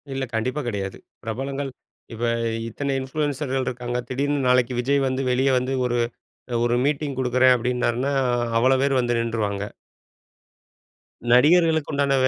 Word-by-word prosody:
இல்ல 135 0 -2
கண்டிப்பா 130 +6 -1
கிடையாது. 100 -4 -3 0.3
பிரபலங்கள் 135 +5 -3 0.4
இப்ப 115 +1 -6 0.4
இத்தனை 140 +5 -3
இன்ஃப்ளூயன்சர்கள் 135 -1 -2
இருக்காங்க. 120 0 -3
திடீர்னு 145 +2 0
நாளைக்கு 125 0 +3
விஜய் 135 +2 +1
வந்து 130 +1 -1
வெளிய 130 +2 +2
வந்து 130 +1 -1
ஒரு 120 -1 0 0.5
அ - - -1
ஒரு 120 0 +2
மீட்டிங் 145 -1 -1
குடுக்குறேன் 130 0 +4
அப்படின்னாருன்னா, 125 +2 0 0.5
அவ்ளோ 130 +3 +4
பேரும் 135 -2 +2
வந்து 120 -1 0
நின்ட்ருவாங்க. 110 -4 -1 1.7
நடிகர்களுக்கு 160 +5 +4
உண்டான 140 -1 +2
130 Hz, 125 wpm, -23 LUFS, 120-140 Hz, 1.7 s, குடுக்குறேன்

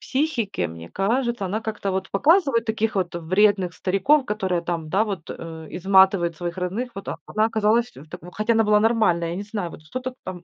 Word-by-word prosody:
психики, 265 - -1
мне 85 0 -10
кажется. 235 +2 0
Она 200 +4 -2
как-то 215 -3 -3
вот 190 0 -3
Показывают 275 - +3
таких 220 0 -1
вот 180 -3 -1
вредных 185 +1 +2
стариков, 255 +12 +2
которые 190 -4 -1
там, 170 -2 -3
да 195 +5 +3
вот, 195 -7 -5
э, 160 -1 -8
изматывают 190 -2 +3
своих 175 +1 -4
родных, 195 +8 -3
вот. 195 - -7 0.2
Она 215 0 +1
оказалась 225 +2 +1
в 145 +4 -13
такой, 170 +3 -10
хотя 215 +4 0
она 225 0 +3
была 210 0 +4
нормальной, 215 -7 +2
я 170 - -4
не 200 - -4
знаю, 205 -4 -4
вот - - -12
что-то 255 +11 -6
там, 180 -1 -7
195 Hz, 195 wpm, -23 LUFS, 175-225 Hz, 0.2 s, была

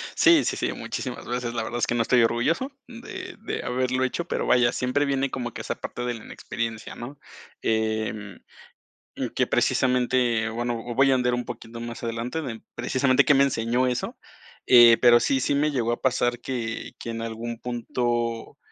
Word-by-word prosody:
Sí, 335 -2 +6
sí, - - -1
sí, - - -1
muchísimas 125 -2 -5
veces, 120 -1 -2
la 115 - -2
verdad 120 +2 -4
es - - +1
que 120 - 0
no 120 - +2
estoy 120 +1 +4
orgulloso 155 - +1 0.2
de 360 +10 -8
de - - -4
haberlo 130 +1 0
hecho, 165 +6 -1
pero - - -2
vaya, 120 -1 +4
siempre 125 +4 0
viene 135 -1 0
como 120 -3 -4
que - - -6
esa - - -3
parte 120 - -6
de 120 - -1
la 110 - -11
inexperiencia, 115 -2 -5
¿no? 135 +4 -9 0.4
Em, 110 -2 -1 1.0
que - - +2
precisamente, 125 -3 +2
bueno, 120 +2 -2 0.2
voy 135 +2 +4
a - - +5
ondear 125 -1 +1
un 120 - -2
poquito 115 0 -8
más 120 0 -7
adelante 120 +7 -3
de 115 -5 -6
precisamente, 130 -1 +2
qué 145 - +5
me 135 - +5
enseñó 125 -1 +1
eso, 125 -1 -2 0.5
eh, 120 -2 +8
pero 120 -1 +6
sí, 135 +3 +1
sí 140 - +1
me 150 +2 +2
llegó 120 -4 0
a - - -3
pasar 120 -2 +1
que 120 -3 -4
que 115 - -6
en 115 0 -4
algún 115 +1 -5
punto, 120 -1 -2
120 Hz, 185 wpm, -25 LUFS, 115-130 Hz, 1.0 s, eh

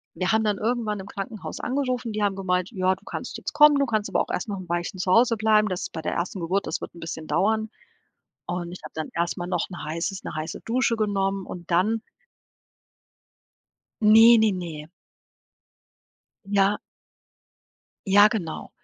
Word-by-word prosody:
wir 185 0 0
haben 220 0 +3
dann 210 -2 +1
irgendwann 220 -2 -1
im 190 - -7
Krankenhaus 200 +1 -6
angerufen, 255 -3 -1
die 210 - -2
haben 200 -2 +1
gemeint: 185 -1 -1
„Ja, 185 -2 +1
du 195 - -24
kannst - - -6
jetzt - - -6
kommen, 295 -1 +7
du 280 - +3
kannst 215 -3 -1
aber - - +1
auch - - -4
erst 220 - -3
noch 200 - -3
'n 185 - -9
Weilchen 175 +2 -2
zu 185 - -2
Hause 230 +2 +4
bleiben, 215 -1 +3
das 185 -1 -3
ist - - -5
bei 160 - -4
der - - -2
1. 180 +3 -3
Geburt 190 +4 -1
das - - -3
wird - - -7
'n - - -11
bisschen 160 -1 -6
dauern.“ 220 +2 +1 0.8
Und 175 -1 -3
ich 180 - -8
habe - - -10
dann 160 -1 -4
erst 170 0 -1
mal 175 - -4
noch 180 - -1
'n 175 - -8
heißes 170 +5 -3
'ne - - -6
heiße 155 +1 -5
Dusche 240 0 +1
genommen 195 -2 0
und 175 -1 -9
dann 210 +6 +2 2.0
Ne, 225 +2 +8
ne, 220 -1 +4
ne. 165 -4 -6 1.6
Ja. 200 +1 +2 1.3
ja 205 +2 +7
genau. 185 -8 -4
195 Hz, 185 wpm, -25 LUFS, 180-220 Hz, 2.0 s, Ne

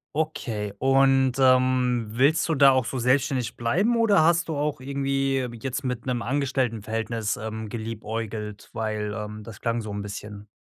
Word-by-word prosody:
Okay 115 -10 -2
und, 135 -1 +4
ähm, 130 -2 +3
willst 135 +10 +2
du 160 - +1
da 140 -1 +7
auch 130 -3 +2
so 130 +3 -4
selbstständig 125 -1 +1
bleiben 195 - +1
oder 210 -7 +4
hast 170 +1 +3
du 155 - -2
auch 145 -2 -1
irgendwie 135 0 -1 0.3
jetzt 135 +2 -3
mit 125 -2 -3
'nem 125 -2 -1
Angestelltenverhältnis, 115 -5 -1
ähm, 110 0 -5
geliebäugelt, 110 -1 -5
weil, 110 -1 -3
ähm, 105 0 -6
das 110 -2 -11
klang 115 0 -1
so 110 -2 -6
'n 100 0 -4
bisschen. 105 0 -8
125 Hz, 160 wpm, -25 LUFS, 110-135 Hz, 0.3 s, da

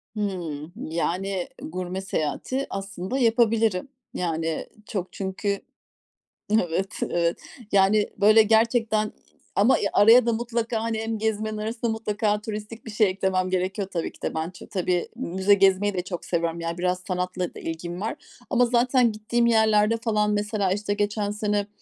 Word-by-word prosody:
Hımm. 175 -7 -3 0.2
Yani, 180 +3 -1 0.2
gurme 180 +2 -4
seyahati 195 - -2
aslında 195 +3 -4
yapabilirim. 225 -4 +2 0.3
Yani, 165 -2 -2 0.2
çok 190 -4 -4
çünkü, 195 +1 -2 0.9
evet, 190 -3 +1 0.2
evet. 170 -1 0 0.3
Yani, 200 +2 +4
böyle, 215 +2 +7
gerçekten 220 -1 +2 0.4
ama 215 +6 +5 0.2
araya 230 +4 +7
da 235 - +2
mutlaka, 230 -1 -2
hani, 225 -1 -1
hem 225 0 -2
gezmenin 215 0 -1
arasında 225 +2 -2
mutlaka 210 -1 -1
turistik 215 +2 -7
bir 225 - -6
şey 215 -1 +3
eklemem 185 -1 0
gerekiyor 185 +2 -1
tabii 170 -3 -2
ki - - -21
de. - - -2
Ben 160 +1 -2
ç 180 - -15
tabii, 180 -3 0
müze 190 -4 +2
gezmeyi 195 +1 +4
de 180 - -1
çok 180 -1 -6
seviyorum, 170 -1 -1
ya, 165 0 -3
biraz 180 0 0
sanatla 180 -1 -2
da - - -9
ilgim 170 +2 -5
var 225 +7 -2 0.3
ama 245 -2 +4
zaten 245 0 +3
gittiğim 225 +3 0
yerlerde, 220 -1 +4
falan, 215 -2 +1
mesela, 205 -2 0
işte, 205 +1 -1
geçen 205 0 -1
sene, 210 -1 -1
205 Hz, 150 wpm, -25 LUFS, 185-220 Hz, 0.9 s, böyle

